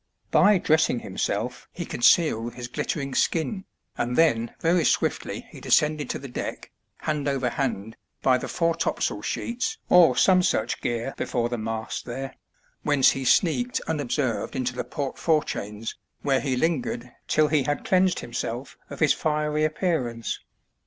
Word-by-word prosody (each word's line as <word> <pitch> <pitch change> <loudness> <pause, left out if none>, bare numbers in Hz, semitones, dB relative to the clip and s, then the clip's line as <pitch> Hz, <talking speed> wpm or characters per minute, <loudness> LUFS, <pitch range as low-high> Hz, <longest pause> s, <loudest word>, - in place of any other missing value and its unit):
By 205 -1 +6
dressing 155 -7 +2
himself - - -3
he - - -5
concealed 120 -4 +3
his 125 -1 -6
glitter 125 - -2
ing 140 -1 -4
skin, 190 +7 0 0.3
and 120 +1 0
then 120 -8 +3
very 170 +1 +3
swiftly - - 0
he - - -11
descended 150 -2 +2
to - - -2
the 140 - -8
deck, 125 - -6 0.3
hand 150 -2 -1
over 135 -3 0
hand, 115 -6 -2 0.3
by 130 -1 +4
the - - -5
foretopsail 165 -1 0
sheets 250 - -2
or 170 -8 +6
some 185 -1 +5
such 120 -9 0
gear 120 +2 -2
before 120 -1 -1
the 120 -1 -3
mast 110 0 -4
there, 135 +2 -5 0.5
whence 145 -3 +4
he 135 - -4
sneaked 200 - +2
unobserved 135 -5 -1
into 125 -1 -1
the 125 - -3
port 140 -2 -4
forechains, 110 -9 -1 0.3
where 135 -2 +2
he 135 -3 0
lingered 125 -4 -1 0.2
till 155 -1 +3
he 155 -2 +3
had 145 +2 -2
cleansed 185 -1 +3
himself 120 +2 -5
of - - -9
his 150 - +5
fiery 150 0 0
appearance. 155 - -1
140 Hz, 150 wpm, -25 LUFS, 120-160 Hz, 0.5 s, By